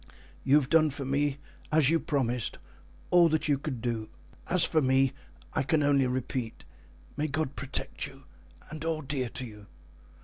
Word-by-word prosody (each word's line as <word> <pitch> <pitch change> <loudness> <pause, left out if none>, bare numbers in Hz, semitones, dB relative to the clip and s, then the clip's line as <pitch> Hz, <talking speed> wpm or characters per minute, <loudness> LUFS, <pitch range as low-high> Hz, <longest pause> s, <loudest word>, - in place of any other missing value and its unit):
You 135 - +4
have 145 -3 +4
done 155 +1 +4
for 140 -1 -5
me, 140 +1 0 0.3
as 155 -2 +4
you 165 - +3
promised, 125 - -1 0.5
all 175 -1 +6
that 160 0 +1
you 145 -2 +2
could 135 -5 -4
do. 115 -3 -2 0.4
As 180 -1 +5
for 155 - +2
me 130 0 +3 0.4
I - - +1
can 150 +3 +1
only 140 -2 +3
repeat, 125 -2 -3 0.5
may 150 +2 -1
God 145 -1 -2
protect 140 -1 -2
you 135 0 -14 0.5
and 155 0 -6
all 160 -1 -1
dear 135 -3 -2
to 130 - -6
you!" 105 -3 -12
140 Hz, 170 wpm, -29 LUFS, 130-155 Hz, 0.5 s, all